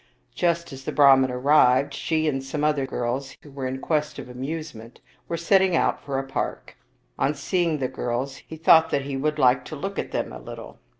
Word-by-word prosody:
Just 170 Hz, -3 st, -1 dB
as 135 Hz, 0 st, -9 dB
the -, -, -3 dB
Brahman 135 Hz, -2 st, +6 dB
arrived, 130 Hz, +1 st, +3 dB
she 155 Hz, +2 st, -1 dB
and 135 Hz, -3 st, -1 dB
some 145 Hz, +2 st, -4 dB
other 150 Hz, -3 st, +1 dB
girls 130 Hz, +2 st, -3 dB
who 145 Hz, -, -14 dB
were 135 Hz, -1 st, -4 dB
in 130 Hz, +1 st, -3 dB
quest 150 Hz, +1 st, -1 dB
of -, -, -7 dB
amusement 130 Hz, -2 st, -7 dB, 0.3 s
were 170 Hz, -, -2 dB
setting 190 Hz, +1 st, +3 dB
out -, -, +1 dB
for 140 Hz, -2 st, -3 dB
a 135 Hz, -, -1 dB
park. 135 Hz, 0 st, -4 dB, 0.4 s
On 145 Hz, +2 st, +1 dB
seeing 170 Hz, +2 st, 0 dB
the 130 Hz, -3 st, -1 dB
girls, 125 Hz, +3 st, -3 dB
he 160 Hz, -, -11 dB
thought 160 Hz, 0 st, +5 dB
that 140 Hz, -, 0 dB
he 140 Hz, 0 st, -4 dB
would 150 Hz, +3 st, -1 dB
like 130 Hz, -2 st, +4 dB
to 155 Hz, -, -7 dB
look 195 Hz, +7 st, -4 dB
at -, -, -3 dB
them -, -, -3 dB
a -, -, -8 dB
little. -, -, -10 dB
140 Hz, 205 wpm, -24 LUFS, 135-155 Hz, 0.4 s, Brahman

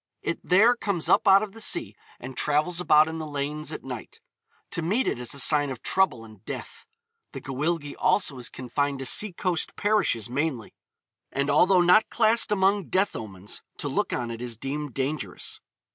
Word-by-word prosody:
It -, -, -2 dB
there 215 Hz, +7 st, +5 dB
comes 200 Hz, -8 st, -1 dB
up -, -, +3 dB
out 195 Hz, +1 st, +7 dB
of 210 Hz, -, -6 dB
the 225 Hz, +2 st, -10 dB
sea 325 Hz, +8 st, -1 dB, 0.2 s
and 130 Hz, +1 st, -8 dB
travels 150 Hz, +6 st, 0 dB
about 155 Hz, -2 st, +5 dB
in 160 Hz, 0 st, -5 dB
the 155 Hz, -, -5 dB
lanes 150 Hz, +1 st, -4 dB
at -, -, -7 dB
night. 125 Hz, -4 st, -8 dB, 0.5 s
To -, -, -2 dB
meet 210 Hz, +11 st, 0 dB
it -, -, -1 dB
is 125 Hz, +3 st, -2 dB
a -, -, -3 dB
sign 145 Hz, 0 st, +4 dB
of 130 Hz, -3 st, -7 dB
trouble 130 Hz, -12 st, +1 dB
and 110 Hz, -2 st, -16 dB
death. -, -, -8 dB, 0.5 s
The -, -, -5 dB
Gwyllgi 145 Hz, +2 st, -2 dB
also 185 Hz, -7 st, +1 dB
is 120 Hz, -, -5 dB
confined 140 Hz, +2 st, -2 dB
to 135 Hz, -, -6 dB
sea 210 Hz, +10 st, +3 dB
coast 175 Hz, -1 st, -2 dB
parishes 205 Hz, -, +1 dB
mainly, 130 Hz, -2 st, -3 dB, 0.6 s
and 140 Hz, +1 st, 0 dB
although 180 Hz, +5 st, +5 dB
not 180 Hz, +5 st, +5 dB
classed 230 Hz, -1 st, +3 dB
among 195 Hz, 0 st, +2 dB
death 190 Hz, +2 st, +1 dB
omens, 100 Hz, -3 st, -7 dB, 0.2 s
to -, -, -3 dB
look -, -, -1 dB
on 120 Hz, -1 st, -2 dB
it 115 Hz, 0 st, -7 dB
is 120 Hz, -2 st, -4 dB
deemed 140 Hz, +1 st, -5 dB
dangerous. 135 Hz, -, -4 dB
150 Hz, 190 wpm, -26 LUFS, 130-190 Hz, 0.6 s, out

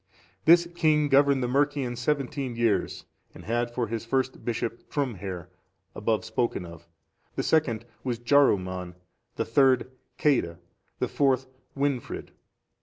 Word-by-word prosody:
This 170 Hz, +1 st, +7 dB
king 155 Hz, -3 st, +2 dB
governed 140 Hz, -1 st, +4 dB
the -, -, 0 dB
Mercians 135 Hz, -2 st, 0 dB
seventeen 140 Hz, -2 st, -1 dB
years, 115 Hz, -3 st, 0 dB, 0.3 s
and -, -, -11 dB
had 120 Hz, +2 st, 0 dB
for 120 Hz, 0 st, -2 dB
his 115 Hz, 0 st, -4 dB
first 130 Hz, +2 st, -1 dB
bishop 115 Hz, 0 st, -3 dB
Trumhere,(450) 100 Hz, -, -3 dB, 0.5 s
above 110 Hz, 0 st, -1 dB
spoken 110 Hz, -4 st, -1 dB
of; 85 Hz, 0 st, -12 dB, 0.5 s
the -, -, -1 dB
second 120 Hz, -8 st, +1 dB, 0.2 s
was 125 Hz, -3 st, -1 dB
Jaruman;(451) 95 Hz, -9 st, +2 dB, 0.4 s
the -, -, -1 dB
third 130 Hz, +1 st, +3 dB, 0.3 s
Ceadda;(452) 105 Hz, -, +2 dB, 0.4 s
the -, -, -1 dB
fourth 135 Hz, -2 st, +2 dB, 0.3 s
Wynfrid. 140 Hz, -3 st, -2 dB
125 Hz, 125 wpm, -27 LUFS, 110-140 Hz, 0.5 s, This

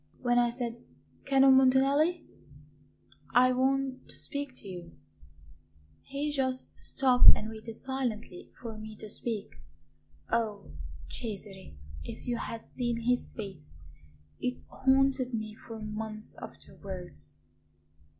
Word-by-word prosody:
When 245 Hz, -1 st, +3 dB
I 240 Hz, 0 st, +4 dB
said: 235 Hz, -1 st, -4 dB, 0.4 s
'Canon 270 Hz, -1 st, +7 dB
Montanelli, 275 Hz, +6 st, +4 dB, 1.1 s
I 255 Hz, +1 st, +7 dB
want 265 Hz, +1 st, +1 dB
to -, -, -10 dB
speak 285 Hz, -2 st, -5 dB
to 205 Hz, -, -6 dB
you,' 175 Hz, -3 st, -8 dB, 1.0 s
he 285 Hz, +2 st, -2 dB
just 260 Hz, -2 st, 0 dB
stopped 255 Hz, -2 st, +7 dB
and 215 Hz, -, -4 dB
waited 220 Hz, 0 st, -8 dB
silently 240 Hz, -8 st, -3 dB
for 225 Hz, -3 st, -6 dB
me 215 Hz, 0 st, -8 dB
to 215 Hz, -, -7 dB
speak. 220 Hz, -1 st, -4 dB, 0.7 s
Oh, 220 Hz, -, 0 dB, 0.4 s
Cesare, 195 Hz, -, -6 dB, 0.3 s
if -, -, -8 dB
you 240 Hz, -1 st, 0 dB
had 230 Hz, 0 st, -4 dB
seen 240 Hz, -2 st, 0 dB
his 245 Hz, +1 st, +1 dB
face 195 Hz, -9 st, -7 dB, 0.7 s
it 250 Hz, 0 st, -2 dB
haunted 265 Hz, -1 st, +3 dB
me 215 Hz, -1 st, -3 dB
for 225 Hz, -2 st, -6 dB
months 215 Hz, 0 st, -5 dB
afterwards! 175 Hz, -, -9 dB
240 Hz, 115 wpm, -31 LUFS, 215-265 Hz, 1.1 s, Canon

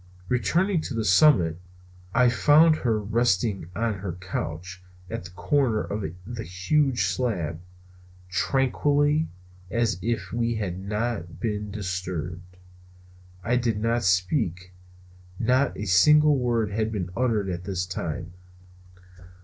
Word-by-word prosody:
Returning 165 Hz, -, +1 dB
to 135 Hz, -, -5 dB
the 110 Hz, -1 st, -1 dB
summit, 90 Hz, -, +4 dB, 0.5 s
I 125 Hz, +3 st, +4 dB
found 155 Hz, +6 st, +5 dB
her 115 Hz, -6 st, 0 dB
again 105 Hz, 0 st, -6 dB
resting 105 Hz, -5 st, +1 dB
on 110 Hz, -3 st, -1 dB
her 95 Hz, -3 st, -4 dB
couch 90 Hz, 0 st, -5 dB, 0.3 s
at -, -, -4 dB
the -, -, -8 dB
corner 110 Hz, +4 st, +1 dB
of 105 Hz, 0 st, -4 dB, 0.2 s
the 115 Hz, +1 st, -6 dB
huge 120 Hz, -, +1 dB
slab, 90 Hz, -4 st, -2 dB, 0.7 s
tranquilly 145 Hz, -, +1 dB, 0.4 s
as 115 Hz, -4 st, 0 dB
if 115 Hz, +3 st, -2 dB
we 115 Hz, 0 st, 0 dB
had 95 Hz, -4 st, -3 dB
not 100 Hz, -4 st, -3 dB
been 105 Hz, -1 st, -2 dB
disturbed. 90 Hz, -3 st, -5 dB, 0.9 s
I 120 Hz, +4 st, +1 dB
did 115 Hz, -4 st, 0 dB
not 115 Hz, +2 st, +1 dB
speak. 90 Hz, -, 0 dB, 0.6 s
Not 125 Hz, +4 st, +1 dB
a 105 Hz, -, -4 dB
single 150 Hz, +11 st, +5 dB
word 120 Hz, -5 st, 0 dB
had 110 Hz, +1 st, -1 dB
been 90 Hz, -5 st, -3 dB
uttered 110 Hz, -6 st, 0 dB
all 85 Hz, -, -3 dB
this 90 Hz, -1 st, -3 dB
time. 85 Hz, -2 st, -5 dB
105 Hz, 125 wpm, -25 LUFS, 90-120 Hz, 0.9 s, found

